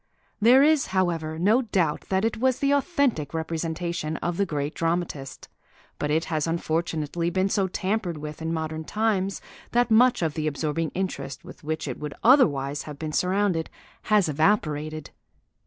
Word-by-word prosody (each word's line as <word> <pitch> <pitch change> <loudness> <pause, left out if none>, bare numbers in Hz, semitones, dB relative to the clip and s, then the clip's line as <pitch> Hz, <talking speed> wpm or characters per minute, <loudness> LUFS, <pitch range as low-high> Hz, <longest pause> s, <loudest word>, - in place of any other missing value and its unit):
There 250 +5 +7
is, 310 -1 +3
however, 170 -4 -1
no 210 +9 +3
doubt 180 - 0
that 190 +2 +1
it 225 - -1
was 260 +3 +1
an 280 - +3
authentic 280 - +1
representation 160 0 -3
of 175 0 -3
the 200 - +1
great 145 0 -2
dramatist, 165 -5 -3 0.5
but 150 - -1
it 160 +2 +1
has 155 -2 -1
unfortunately 165 0 -1
been 190 +2 +1
so 195 -1 +1
tampered 190 -2 -2
with 150 +1 -7
in 160 0 -2
modern 160 -1 -3
times 200 0 -1 0.3
that 240 -1 +2
much 240 -3 +5
of 160 -2 0
the 155 0 -2
absorbing 155 +2 -1
interest 160 -5 -4
with 180 - -12
which 155 0 -3
it 130 - -5
would 150 -1 -6
otherwise 145 - +4
have 145 - -8
been 155 0 -5
surrounded 180 -2 +1 0.4
has 210 -4 +3
evaporated. 155 -2 0
165 Hz, 160 wpm, -25 LUFS, 155-200 Hz, 0.5 s, There